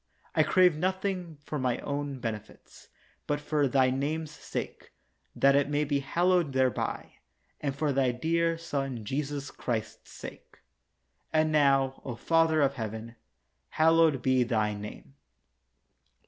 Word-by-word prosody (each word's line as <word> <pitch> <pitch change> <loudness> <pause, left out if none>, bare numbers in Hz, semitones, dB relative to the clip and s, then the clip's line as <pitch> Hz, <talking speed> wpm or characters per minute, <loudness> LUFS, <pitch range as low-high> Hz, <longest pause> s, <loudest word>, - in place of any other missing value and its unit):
I - - +4
crave 180 -3 +4
nothing 185 -1 -2
for 150 - -3
mine 125 -2 0
own 140 -1 -3
merits, 110 -3 -7 0.4
but 145 0 0
for 145 -1 +1
Thy 130 -1 +3
name's 150 +4 -2
sake, 150 - -6 0.4
that 140 0 +4
it 140 0 +2
may 145 0 +1
be 145 -1 0
hallowed 170 +1 +1
thereby, 130 -1 -1 0.4
and 140 -2 -2
for 145 0 0
Thy 130 -2 +2
dear 165 +6 0
Son 135 -8 -4
Jesus 140 +2 -3
Christ's 115 -3 -4
sake. - - -11 0.7
And 155 0 +2
now, 135 -3 +3
O 125 - -5
Father 165 +3 +3
of 140 0 +2
Heaven, 110 -1 -6 0.5
hallowed 160 -4 +4
be 130 -1 +3
Thy 110 -3 +1
name. 105 -9 -9
140 Hz, 135 wpm, -29 LUFS, 130-155 Hz, 0.7 s, I